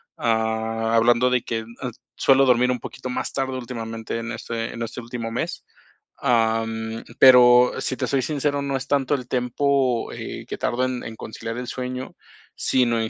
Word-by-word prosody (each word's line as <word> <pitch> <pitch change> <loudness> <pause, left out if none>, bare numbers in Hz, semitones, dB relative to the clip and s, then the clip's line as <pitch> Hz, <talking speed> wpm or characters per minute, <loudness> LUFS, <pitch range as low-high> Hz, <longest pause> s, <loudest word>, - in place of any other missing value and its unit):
ah, 110 0 0
hablando 120 +2 +4
de 125 -1 +2
que 115 - -2
n 110 - -9
ah, 125 - -3 0.2
suelo 135 0 +5
dormir 125 0 +4
un 125 - -2
poquito 130 +2 -7
más 125 - -3
tarde, 130 -1 -2
últimamente 115 -2 -5
en 115 +1 -5
este 115 0 -4
en 115 - -7
este 115 +1 -4
último 115 -1 -5
mes, 115 - -4 0.5
am, 115 -1 0 0.2
pero, 125 -1 +8
si 130 - -2
te - - -1
soy 135 -1 +1
sincero, 145 +1 -1
no 140 -1 -1
es 135 +1 -7
tanto 140 0 +2
el 125 -3 -6
tempo 125 0 0
eh, - - -7
que - - -5
tardo 125 +2 0
en 130 -1 -3
en 110 - -7
conciliar 115 +1 -6
el 125 0 -5
sueño, 125 +1 -5 0.4
sino 120 -3 +2
en 110 - -2
125 Hz, 185 wpm, -23 LUFS, 115-130 Hz, 0.5 s, pero